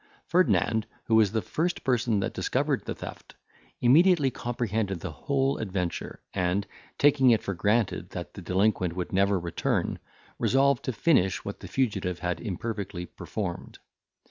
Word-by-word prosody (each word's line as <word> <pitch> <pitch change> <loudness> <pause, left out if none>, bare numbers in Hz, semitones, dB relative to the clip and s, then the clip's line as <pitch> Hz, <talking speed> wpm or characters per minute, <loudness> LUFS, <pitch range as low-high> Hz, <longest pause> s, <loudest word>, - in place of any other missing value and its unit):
Ferdinand, 115 -11 +2 0.2
who 115 - -2
was 110 -3 +5
the 110 -1 -1
first 175 +3 -2
person 120 -5 +1
that - - -2
discovered - - 0
the - - -3
theft, - - -9 0.5
immediately 150 +2 +5
comprehended 110 -6 -2
the 95 - -4
whole 135 - 0
adventure, 95 -5 -3
and, 90 +3 0 0.3
taking 140 -3 +5
it 115 -2 +4
for 100 - -2
granted 105 +4 0
that - - -7
the - - -9
delinquent 95 -2 +1
would 90 +1 -4
never 100 +1 +3
return, 85 -1 -1 0.4
resolved 135 -1 +3
to 130 - 0
finish 110 - +2
what - - -5
the - - -9
fugitive 105 -9 -1
had 90 -1 -3
imperfectly 100 -3 -4
performed. 90 -1 -6
110 Hz, 145 wpm, -27 LUFS, 95-130 Hz, 0.5 s, was